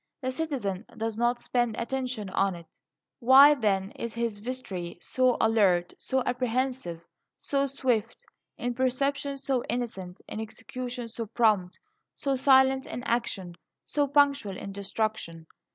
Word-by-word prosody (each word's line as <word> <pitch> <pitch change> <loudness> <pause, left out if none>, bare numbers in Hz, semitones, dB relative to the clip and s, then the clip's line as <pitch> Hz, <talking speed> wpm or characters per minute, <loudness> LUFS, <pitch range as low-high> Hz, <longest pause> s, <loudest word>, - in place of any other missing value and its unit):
The 260 -2 -2
citizen 255 -10 -3
does 225 -1 -2
not 240 +1 +1
spend 240 -3 0
attention 245 -4 -3
on 195 0 +1
it. 170 -1 -11 0.5
Why, 270 +4 +8
then, 200 -6 0
is 230 -1 -6
his 230 -3 -2
vestry 205 -8 -5
so 255 +5 +1
alert, 195 -6 +3
so 265 -1 0
apprehensive, 250 -7 -1 0.4
so 280 0 0
swift; 255 -5 -1 0.3
in 245 0 -2
perception 275 +3 0
so 270 -2 -1
instant, 195 -7 -4
in - - -6
execution 245 +2 -6
so 230 0 -5
prompt, 210 -5 +2 0.4
so 275 -1 0
silent 265 0 +4
in 245 - -5
action, 215 -7 -1 0.3
so 290 -1 +1
punctual 280 -8 +2
in 200 - -6
destruction? 200 -4 -3
240 Hz, 135 wpm, -28 LUFS, 205-260 Hz, 0.5 s, Why